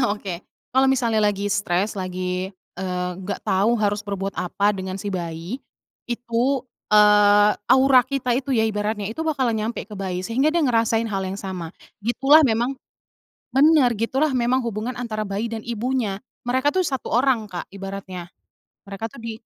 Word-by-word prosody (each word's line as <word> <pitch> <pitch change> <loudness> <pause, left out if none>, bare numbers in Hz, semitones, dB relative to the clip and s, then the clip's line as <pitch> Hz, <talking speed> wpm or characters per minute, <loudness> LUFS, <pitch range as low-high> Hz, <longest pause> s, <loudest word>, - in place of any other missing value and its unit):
oke 200 -3 -5 0.4
kalau 265 +1 +4
misalnya 235 -4 +2
lagi 205 -1 +1
stres 200 0 0
lagi, 185 -1 -3 0.3
eee, 180 -1 -2
nggak 190 +1 -5
tau 205 +5 +2
harus 205 -1 0
berbuat 200 -1 -4
apa 200 +3 0
dengan 190 -1 -5
si 200 0 -4
bayi, 170 +7 -5 0.5
itu, 245 +2 0 0.2
eee, 210 0 +6 0.2
aura 260 0 +6
kita 255 -1 -1
itu 265 +3 -2
ya 220 -1 +3
ibaratnya 210 -1 -2
itu 220 +10 -4
bakalan 275 -7 0
nyampe 225 +2 -3
ke 210 - -11
bayi 185 -2 -3
sehingga 260 +8 +2
dia 325 -1 +1
ngerasain 230 -2 +2
hal 200 -3 -2
yang 190 +1 -4
sama, 185 -4 -5 0.3
gitulah 270 +8 +5
memang 240 +3 +1 0.8
bener 280 -1 +5
gitulah 265 +7 +1
memang 255 0 +1
hubungan 230 +2 -3
antara 215 -3 -3
bayi 210 +4 -3
dan 225 - -3
ibunya, 235 -3 -2 0.2
mereka 260 +4 +2
tuh 370 +2 +1
1 265 -2 -3
orang 250 -1 +3
Kak 175 - -5
ibaratnya, 195 -2 -7 0.5
mereka 200 +3 -5
tuh - - -16
di 230 - -3
220 Hz, 160 wpm, -23 LUFS, 195-250 Hz, 0.8 s, eee